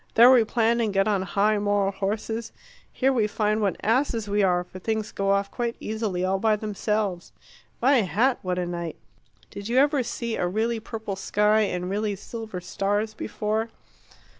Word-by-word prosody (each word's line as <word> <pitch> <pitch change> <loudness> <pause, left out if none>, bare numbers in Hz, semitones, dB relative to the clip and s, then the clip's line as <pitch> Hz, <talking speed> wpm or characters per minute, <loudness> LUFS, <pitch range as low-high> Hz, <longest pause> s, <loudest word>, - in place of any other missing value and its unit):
There 240 +3 +9
we 250 -3 +6
plan 230 +1 +1
and 220 -2 0
get 195 +1 +2
on 205 -3 +1
high 205 +2 +1
moral 205 -1 +1
horses. 220 +3 -3 0.4
Here 270 +1 +1
we 225 -4 +2
find 215 0 0
what 200 -3 +1
asses 230 -1 +1
we 205 +1 +1
are, 180 -2 +2
for 185 +1 -11
things 220 +2 -2
go 195 0 -1
off 200 0 +1
quite 235 -1 -2
easily, 210 -5 -2
all 190 +1 0
by 220 +1 +3
themselves. 210 -3 -2 0.5
My 270 +2 +5
hat, 220 - +1
what 180 -1 -2
a 180 - -1
night! 170 -1 -4 0.6
Did 200 +2 -7
you 245 - +1
ever 285 0 +4
see 235 -1 -3
a 180 - 0
really 225 +5 -1
purple 220 -2 -5
sky 210 +2 +2
and 180 -2 -3
really 205 +2 -1
silver 220 -1 -7
stars 205 +4 -1
before? 215 +1 -2
210 Hz, 180 wpm, -25 LUFS, 195-225 Hz, 0.6 s, There